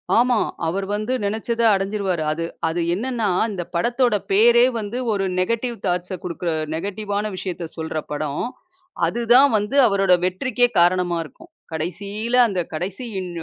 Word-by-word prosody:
ஆமா. 245 +1 +4 0.3
அவரு 195 +4 -2
வந்து 215 +4 -2
நெனைச்சத 220 +3 -2
அடைஞ்சுருவாரு. 195 -3 -1
அது 165 +2 -3 0.2
அது 165 +2 -1
என்னன்னா, 230 +1 -1 0.2
இந்தப் 180 -4 -6
படத்தோட 240 +5 +2 0.2
பேரே 235 +4 +6
வந்து 215 +3 -4 0.2
ஒரு 200 -1 -1 0.2
நெகடிவ் 230 +5 -1
தாட்ஸ 180 +1 -1
குடுக்குற 175 -1 -3 0.2
நெகடிவான 200 +4 -3
விஷயத்தை 180 -2 -5
சொல்ற 160 0 -4
படம். 150 -1 -2 0.6
அது 240 - -2
தான் 275 +3 +7
வந்து 210 +6 -2
அவரோட 195 -2 +3
வெற்றிக்கே 245 +7 +2
காரணமா 175 0 +3
இருக்கும். 325 - -15 0.2
கடைசியில 200 +8 -2
அந்தக் 185 -5 -3
கடைசி 180 +9 -4 0.2
இன் 185 -1 -5
195 Hz, 140 wpm, -21 LUFS, 175-230 Hz, 0.6 s, தான்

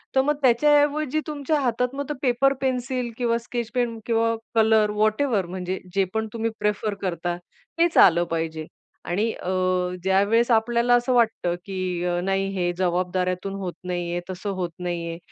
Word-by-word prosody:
तर 265 - +6
मग 295 +2 +1
त्याच्याऐवजी 290 +3 +3
तुमच्या 300 0 -1
हातात 250 -1 0
मग 285 +1 -4
पेपर-पेन्सिल 255 -1 0
किंवा 235 -2 +1
स्केच 235 -1 -5
पेन 240 -2 0
किंवा 230 -1 +1 0.2
कलर 220 -1 +4
व्हॉटएव्हर 215 0 +1
म्हणजे 185 +1 -4 0.2
जे 195 - +4
पण 220 0 -1
तुम्ही 230 0 -1
प्रिफर 210 0 0
करता, 175 -2 -2 0.4
तेच 335 0 +2
आलं 175 -2 +7
पाहिजे. 160 -1 -2 0.4
आणि 205 +6 0
अ, 180 - -6 0.5
ज्यावेळेस 200 +6 +3
आपल्याला 235 +2 +3
असं 245 +1 +1
वाटतं, 225 -7 +2
की 185 -3 -3
अ, 175 0 0
नाही 195 +1 0
हे 175 -1 +1
जबाबदाऱ्यातून 180 +1 -1
होत 180 -2 -4
नाहीये, 175 -1 -2
तसं 185 +2 -5
होत 175 -2 -2
नाहीये, 170 -2 -3
220 Hz, 150 wpm, -24 LUFS, 180-245 Hz, 0.5 s, आलं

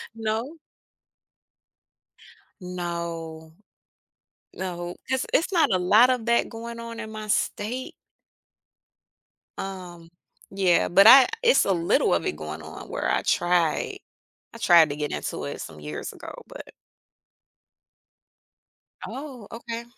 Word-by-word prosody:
No. 225 +7 -3 2.1
No. 170 -3 -6 1.0
No, 175 -1 -5
'cause 265 0 -1
it's 335 - +2
not 335 -3 +3
a 185 - +3
lot 210 +7 +5
of 250 -3 0
that 235 0 +2
going 230 0 -8
on 230 0 -8
in 220 -1 -6
my 215 0 -7
state. 235 +5 -2 1.7
Um, 180 -3 -7 0.4
yeah, 190 -3 +2
but 195 +4 +6
I 260 +2 +10 0.2
it's 485 +1 +5
a 195 - +1
little 170 -2 +2
of - - -1
it - - -2
going 75 +1 -7
on 80 - -10
where - - -3
I - - +1
try 175 -2 +1 0.6
I - - -10
tried 170 -7 +6
to 145 - -4
get 150 -1 -3
into 75 - -4
it 70 - -6
some 75 - -9
years 75 0 -6
ago, - - -10
but - - -11 2.3
Oh, 255 -3 -8
okay. 230 0 -6
195 Hz, 125 wpm, -25 LUFS, 170-230 Hz, 2.3 s, I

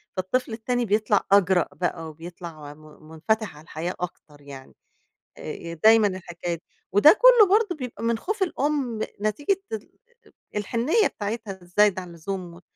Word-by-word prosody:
فالطفل 220 +6 -1
التاني 245 +2 -1
بيطلَع 210 0 +2
أجرأ 190 -3 +4
بقى 165 -3 -3
وبيطلع 165 -2 -10
م 150 - -20 0.3
مُنفتح 210 +4 -2
على 150 - -14
الحياة 170 +2 -5
أكتر 150 -4 -8
يعني. 140 -2 -12 0.6
آآ، - - -11
ي 170 0 -7
دايمًا 220 +5 +6
الحكاية 175 -2 -5
دي. 165 - -16 0.3
وده 290 - +6
كلّه - - +8
برضو 415 -6 -1
بيبقى 250 -5 -7
من 230 0 +1
خوف 405 - -2
الأم، 280 -9 -1 0.2
نتيجة 290 - 0
ال 220 -1 -4 0.5
أأ - - -11
الحنّية 250 - +1
بتاعتها 205 -2 -5
الزايدة 190 +2 +2
عن 180 - -10
اللزوم 175 +1 -6
و 180 - -15
200 Hz, 155 wpm, -25 LUFS, 170-235 Hz, 0.6 s, كلّه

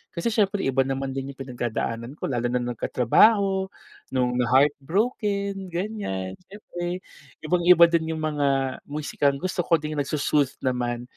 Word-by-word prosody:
Kasi 175 +7 -1
siyempre 205 -3 +1
iba 135 0 0
naman 135 0 -2
din 135 0 -4
yung 135 - -30
pinagdadaanan 120 -1 -4
ko, - - -15
lalo 120 -1 0
na 125 +1 0
nagkatrabaho, 190 - +3 0.5
nung 125 -1 +1
na-heartbroken, 195 - +1
ganyan, 175 - -4
siyempre 180 -3 -6 0.4
ibang-iba 175 +2 +5
din 160 -1 0
yung 155 - -5
mga 140 -3 0
musikang 145 -1 0
gusto 185 +6 -4
ko 170 -1 +3
ding 150 -1 -3
nagso-soothe 145 -1 0
naman 120 -2 -1
150 Hz, 135 wpm, -25 LUFS, 130-185 Hz, 0.5 s, ibang-iba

